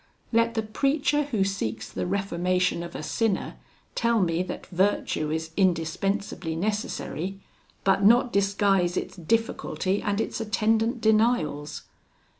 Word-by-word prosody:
"'Let 230 0 +2
the 220 - 0
preacher 280 +6 +1
who 225 -9 0
seeks 115 - -3
the - - -4
reformation 180 -2 0
of 170 0 -7
a - - -5
sinner 200 +6 -1 0.4
tell 235 -1 +2
me 170 -2 +1
that 185 - -5
virtue 180 -4 0
is 160 +1 -3
indispensably 185 0 0
necessary, 195 -1 -3 0.4
but 195 0 +3
not 235 +4 +5
disguise 195 -2 +2
its - - -3
difficulty 190 -1 -1
and 205 0 -1
its 225 - -2
attendant 225 +2 +1
denials. 215 -10 +1
195 Hz, 125 wpm, -26 LUFS, 175-225 Hz, 0.4 s, not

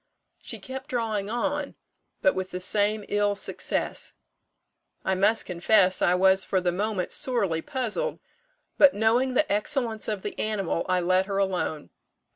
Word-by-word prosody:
She - - -5
kept 265 +1 -8
drawing 220 -5 -2
on, 285 +5 -2 0.5
but 290 - +5
with 185 0 -4
the 180 - -5
same 205 +2 +1
ill 205 0 +1
success. - - -1 0.9
"I 190 - +1
must 205 +4 +2
confess 185 +1 +3
I 175 - +4
was 190 +1 +4
for 190 - 0
the 180 -1 0
moment 200 0 -2
sorely 200 -11 0
puzzled; 260 - -2 0.6
but 285 -1 +7
knowing 240 +5 +2
the 305 - +2
excellence 220 +1 -1
of 210 -3 -3
the 205 - -5
animal, 200 -6 -1
I 185 0 +2
let 185 +2 +2
her 195 -1 -2
alone. 180 - -2
205 Hz, 150 wpm, -26 LUFS, 185-235 Hz, 0.9 s, but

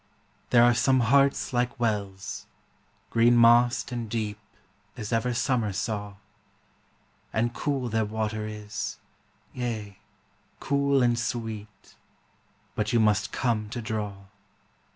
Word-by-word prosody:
There 120 -1 +6
are 120 0 +6
some 130 +2 +3
hearts 140 +3 +3
like 125 +1 0
wells, 100 -4 -3 0.6
green 120 +1 +5
mossed 120 +2 +5
and 120 -2 -4
deep 105 -2 -3 0.6
As 110 -1 -4
ever 115 +2 +1
Summer 120 -3 0
saw; 100 0 -3 1.2
And 115 +2 0
cool 135 0 -2
their 110 -1 0
water 110 0 -3
is, 105 0 -5 0.6
yea, 110 -5 -4 0.6
cool 140 -1 +2
and 120 -1 +2
sweet; 110 -4 -5 0.8
But 105 0 -1
you 120 - +4
must 105 -1 +2
come 110 -4 -1
to 120 - -5
draw. 105 -3 -3
115 Hz, 115 wpm, -27 LUFS, 105-120 Hz, 1.2 s, There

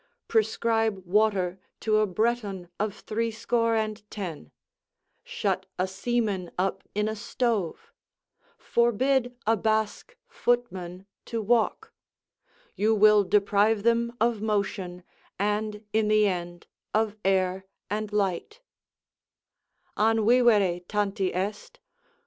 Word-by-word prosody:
Prescribe 220 -2 +1
water 190 -2 +1 0.2
to 215 0 +2
a 215 0 +3
Breton 200 -3 -1
of 210 0 -1
threescore 230 +1 0
and 215 -1 -1
ten; 170 - -6 0.7
shut 190 -1 -2
a 185 - 0
seaman 195 -2 -1
up 190 +1 0
in 210 +1 +1
a 220 - -2
stove; 225 -5 -2 0.6
forbid 245 - +1
a 225 - +4
Basque 220 - -1
footman 190 -7 -2 0.2
to 230 - -3
walk: 225 +1 +1 0.8
you 220 +2 +2
will 210 0 +6
deprive 205 +2 +2
them 235 +1 +1
of 230 -1 +1
motion, 195 -4 -2 0.3
and 210 +1 -1
in 220 -1 +2
the 215 0 +4
end 175 -3 -3 0.3
of 215 -1 +1
air 190 0 +1 0.2
and 210 +1 -3
light: 200 - -1 1.4
"An 220 0 +3
vivere 215 -7 +4
tanti 200 -2 0
est? 200 +4 -4
210 Hz, 110 wpm, -27 LUFS, 190-225 Hz, 1.4 s, will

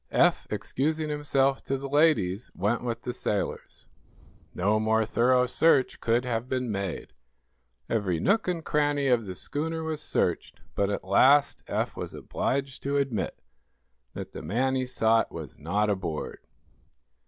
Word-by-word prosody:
Eph, - - +3
excusing 155 +3 -1
himself 140 -2 +1
to 135 - -1
the 140 +1 -6
ladies, 135 - +2
went 105 +7 0
with 115 -1 -3
the 125 - -3
sailors. 105 -4 -3 0.7
No 105 +4 +2
more 110 0 +2
thorough 125 +3 +3
search 135 +1 +3
could 120 +2 +1
have 120 0 -2
been 125 -3 -1
made. 100 -3 -4 0.7
Every 95 -7 0
nook 200 - +2
and 170 -3 -2
cranny 145 -1 +1
of 115 -4 +2
the 95 - -5
schooner 160 - -3
was 160 -1 -3
searched, - - -1
but 100 0 0
at 100 - -2
last 140 +9 +4
Eph - - -2
was - - -6
obliged 135 0 -2
to 140 +1 -1
admit 130 -8 -1 0.8
that - - -6
the - - -7
man 130 +6 0
he 130 -1 -1
sought 115 -2 +2
was 80 -5 -8
not 100 +7 0
aboard. 95 -6 -3
125 Hz, 150 wpm, -27 LUFS, 105-140 Hz, 0.8 s, last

